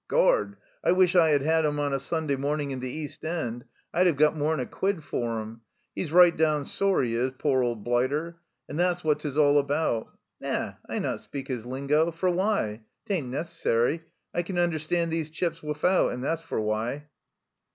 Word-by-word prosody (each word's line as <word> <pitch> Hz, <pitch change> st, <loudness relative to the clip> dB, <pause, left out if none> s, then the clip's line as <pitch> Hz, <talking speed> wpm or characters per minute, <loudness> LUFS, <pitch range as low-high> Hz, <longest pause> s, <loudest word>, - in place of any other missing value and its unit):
Gord! -, -, +2 dB, 0.2 s
1 -, -, +3 dB
wish 185 Hz, 0 st, +4 dB
I 165 Hz, -3 st, +6 dB
had 145 Hz, -2 st, +3 dB
had 160 Hz, +2 st, +3 dB
'em 150 Hz, -1 st, 0 dB
on 145 Hz, -1 st, 0 dB
a 135 Hz, -, +1 dB
Sunday 155 Hz, +1 st, -1 dB
morning 145 Hz, +1 st, -1 dB
in 130 Hz, -, -4 dB
the 130 Hz, 0 st, -4 dB
East 150 Hz, +1 st, -6 dB
End! 125 Hz, -8 st, -3 dB, 0.3 s
I'd 180 Hz, +2 st, +4 dB
'ev 170 Hz, -, +3 dB
got 150 Hz, +2 st, +4 dB
more'n 155 Hz, 0 st, 0 dB
a 125 Hz, -, -1 dB
quid 190 Hz, +1 st, -2 dB
for 115 Hz, -5 st, -2 dB
'em! 110 Hz, +1 st, -8 dB, 0.3 s
'E's 160 Hz, -, -3 dB
right 175 Hz, 0 st, +7 dB
down 155 Hz, -2 st, +1 dB
sore, 195 Hz, -2 st, +1 dB
'e 115 Hz, -2 st, -1 dB
is, 120 Hz, +3 st, +1 dB
pore 135 Hz, -3 st, +2 dB
old 120 Hz, -4 st, -1 dB
blighter! 140 Hz, +8 st, 0 dB, 0.3 s
And 150 Hz, -, -5 dB
thet's 180 Hz, 0 st, +1 dB
what 155 Hz, -2 st, +2 dB
'tis 145 Hz, -2 st, -4 dB
all 145 Hz, -1 st, +5 dB
about. 140 Hz, -5 st, 0 dB, 0.3 s
Na, -, -, -2 dB, 0.2 s
I -, -, -2 dB
not -, -, -2 dB
speak 135 Hz, -1 st, -7 dB
his 120 Hz, -3 st, -4 dB
lingo 140 Hz, +5 st, +1 dB
for 170 Hz, +2 st, 0 dB
why? 180 Hz, -, 0 dB, 0.2 s
'Tain't 185 Hz, -, -1 dB
necessary; 150 Hz, -1 st, 0 dB, 0.3 s
I 175 Hz, -, +1 dB
can 175 Hz, +1 st, -5 dB
understand 170 Hz, 0 st, 0 dB
these 160 Hz, -1 st, -2 dB
chaps 165 Hz, +1 st, -2 dB
wifout, 150 Hz, +5 st, +1 dB
and 125 Hz, -, -5 dB
that's 165 Hz, +3 st, -1 dB
for 165 Hz, -, -3 dB
why." 110 Hz, +7 st, -2 dB
150 Hz, 195 wpm, -27 LUFS, 130-170 Hz, 0.3 s, right